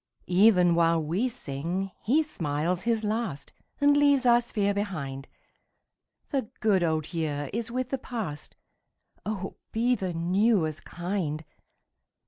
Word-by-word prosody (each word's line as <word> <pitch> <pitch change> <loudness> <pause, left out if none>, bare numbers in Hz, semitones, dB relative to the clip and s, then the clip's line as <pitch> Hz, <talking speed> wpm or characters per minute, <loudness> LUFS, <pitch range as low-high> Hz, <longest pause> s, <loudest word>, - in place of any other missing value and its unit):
37 180 +2 +3
Even 180 -5 +5
while 165 0 +3
we 185 +12 0
sing 180 - -3
he 295 +8 +3
smiles 170 - -1
his 230 0 0
last 210 -8 -3 0.3
And 285 0 +5
leaves 285 -2 +4
our 240 0 +6
sphere 205 -4 0
behind. 155 -10 -4 1.0
The 265 -6 -1
good 205 -4 +3
old 160 -1 -1
year 145 -4 -2
is 230 +1 -2
with 255 +1 -3
the 270 - -1
past; 210 - -5 0.7
Oh 195 -3 -4
be 235 +3 +2
the 190 -6 -2
new 185 +3 +2
as 155 -1 -4
kind 175 -4 -3
195 Hz, 135 wpm, -27 LUFS, 165-235 Hz, 1.0 s, our